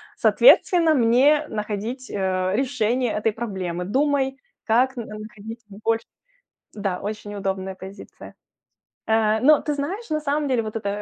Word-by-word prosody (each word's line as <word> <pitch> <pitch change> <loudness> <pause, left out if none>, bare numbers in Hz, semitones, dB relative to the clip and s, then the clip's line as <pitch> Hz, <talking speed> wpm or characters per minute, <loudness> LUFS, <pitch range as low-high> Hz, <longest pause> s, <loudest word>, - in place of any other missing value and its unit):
соответственно, 345 -9 +5
мне 275 +5 +4
находить, 220 +4 -4
э, 185 -1 -1
решение 250 -2 0
этой 215 +1 0
проблемы. 190 -6 -4
Думай, 270 +3 0 0.3
как 255 +4 +2
находить 220 0 -8
больше. 225 +3 -2 0.7
Да, 195 -3 -3
очень 205 0 -6
удобная 190 -1 -3
позиция. 190 +2 -12 0.7
Э, 220 0 +2
но 300 +3 +5
ты 295 - -2
знаешь, 345 +9 -4
на 305 0 0
самом 295 0 -1
деле 250 -3 +1
вот 215 0 -6
эта, 205 -2 -3
225 Hz, 130 wpm, -23 LUFS, 205-270 Hz, 0.7 s, соответственно